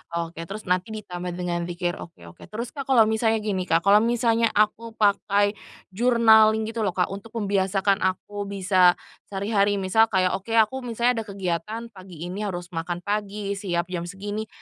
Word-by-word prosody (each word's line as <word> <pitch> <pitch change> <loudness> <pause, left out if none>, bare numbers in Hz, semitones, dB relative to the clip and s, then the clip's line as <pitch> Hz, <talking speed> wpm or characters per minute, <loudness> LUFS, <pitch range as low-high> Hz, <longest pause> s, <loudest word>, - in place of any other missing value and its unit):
Oke 170 0 -4
terus 215 +2 -7
nanti 185 +4 -1
ditambah 180 -4 -6
dengan 175 -1 -2
dzikir 175 0 -3
oke 85 - -11
oke - - -15
terus 230 +3 -6
Kak 275 -2 -7
kalau 245 -4 +6
misalnya 220 0 +1
gini 190 -4 -2
Kak 165 +1 +2
kalau 200 +1 +6
misalnya 230 0 +2
aku 220 +2 +1
pakai 205 -1 +2 0.4
journaling 220 -1 +5
gitu 230 - -5
loh 195 -5 -1
Kak 180 +1 0
untuk 215 +4 -9
membiasakan 195 -1 +1
aku 205 +2 -4
bisa 185 -2 +3 0.3
sehari-hari 200 0 +1
misal 200 +4 +3
kayak 185 -2 +1
oke 200 +4 -3
aku 225 +4 +3
misalnya 240 0 0
ada 220 - -5
kegiatan 195 +3 -3
pagi 185 -4 -11
ini 180 +3 -5
harus 175 -1 -6
makan 175 +1 -4
pagi 205 -1 -3
siap 185 -3 -2
jam 175 -1 -3
segini, 205 +3 -5
200 Hz, 170 wpm, -24 LUFS, 180-220 Hz, 0.4 s, kalau